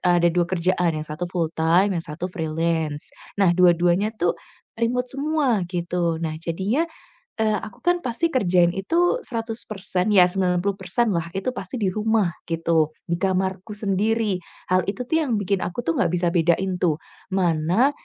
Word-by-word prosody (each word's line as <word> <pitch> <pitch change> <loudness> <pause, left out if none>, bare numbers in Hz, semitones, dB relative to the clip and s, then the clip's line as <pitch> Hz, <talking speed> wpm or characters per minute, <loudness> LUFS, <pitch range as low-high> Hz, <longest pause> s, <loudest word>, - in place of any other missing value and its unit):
ada 175 -2 +3
2 175 -1 +1
kerjaan 180 -1 +1
yang 155 - -4
satu 155 +3 -5
full 170 -3 -1
time 170 +5 +3
yang 175 - -1
satu 170 +3 -6
freelance. 160 -2 -2 0.2
Nah, 195 -4 +4
dua-duanya 175 +2 +4
tuh 175 -4 +2 0.4
remote 240 +2 0
semua 280 -5 +1
gitu. 175 -2 -1
Nah, 160 -1 -2
jadinya, 190 - 0 0.6
eee, 215 -1 +2
aku 210 - -10
kan 350 0 +3
pasti 255 +7 0
kerjain 180 - +3
itu 335 - +1
100% 215 -4 -2
ya 180 -2 +7
90%-lah 190 +1 0
itu 195 +6 -1
pasti 195 +6 -5
di 200 - +2
rumah 215 -2 +1 0.2
gitu, 165 -2 +1 0.2
di 170 - +1
kamarku 190 +2 -1
sendiri. 210 +1 +1 0.3
Hal 185 0 +3
itu 210 +6 -2
tuh 320 - +2
yang 250 -5 0
bikin 200 -1 0
aku 180 - -3
tuh 165 -8 -1
gak - - +1
bisa 175 0 +1
bedain 175 +2 +1
tuh, 165 -4 +1 0.3
mana 180 - +2
185 Hz, 155 wpm, -23 LUFS, 170-215 Hz, 0.6 s, ya